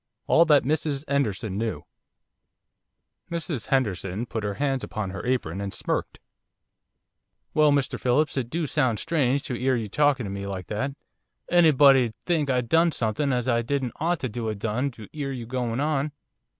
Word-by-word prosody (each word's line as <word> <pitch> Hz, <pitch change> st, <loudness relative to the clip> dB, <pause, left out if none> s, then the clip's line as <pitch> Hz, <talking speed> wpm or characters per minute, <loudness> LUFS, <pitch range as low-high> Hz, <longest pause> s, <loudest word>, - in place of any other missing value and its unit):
ALL 165 Hz, -, +5 dB
THAT 150 Hz, -3 st, +5 dB
MRS 145 Hz, 0 st, -1 dB
'ENDERSON 110 Hz, -7 st, -1 dB
KNEW 115 Hz, -1 st, -3 dB, 1.4 s
Mrs 165 Hz, -7 st, -3 dB
Henderson 105 Hz, -5 st, 0 dB
put 110 Hz, -2 st, -4 dB
her 100 Hz, -1 st, -2 dB
hands 135 Hz, 0 st, -1 dB
under 100 Hz, -3 st, -3 dB
her 95 Hz, -, -6 dB
apron 100 Hz, -8 st, -1 dB
and 100 Hz, -1 st, -4 dB
smirked. -, -, -2 dB, 1.3 s
'Well, 150 Hz, -1 st, +5 dB
Mr 140 Hz, -2 st, 0 dB
Phillips, 135 Hz, +5 st, +1 dB
it 125 Hz, -4 st, -2 dB
do 165 Hz, +3 st, -1 dB
sound 130 Hz, -6 st, +1 dB
strange 140 Hz, -3 st, +1 dB
to -, -, -4 dB
'ear 130 Hz, +2 st, +1 dB
you 115 Hz, -3 st, -2 dB
talkin' 145 Hz, 0 st, +2 dB
to 100 Hz, -, -5 dB
me 100 Hz, 0 st, -5 dB
like 95 Hz, -2 st, -5 dB
that. 135 Hz, +6 st, -2 dB, 0.6 s
Anybody'd 140 Hz, -8 st, +5 dB
think 160 Hz, -5 st, -1 dB
I'd 125 Hz, -2 st, +1 dB
done 165 Hz, +5 st, +4 dB
something 125 Hz, +3 st, -1 dB
as 125 Hz, -1 st, 0 dB
I 120 Hz, -2 st, +2 dB
didn't 130 Hz, 0 st, -2 dB
ought 170 Hz, +1 st, 0 dB
to 120 Hz, -2 st, -3 dB
'a' 110 Hz, -, -2 dB
done 115 Hz, +6 st, -1 dB
to 110 Hz, -5 st, -11 dB
'ear 145 Hz, -3 st, -3 dB
you 125 Hz, -3 st, -5 dB
going 120 Hz, 0 st, -2 dB
on. 145 Hz, 0 st, 0 dB
130 Hz, 170 wpm, -25 LUFS, 110-145 Hz, 1.4 s, ALL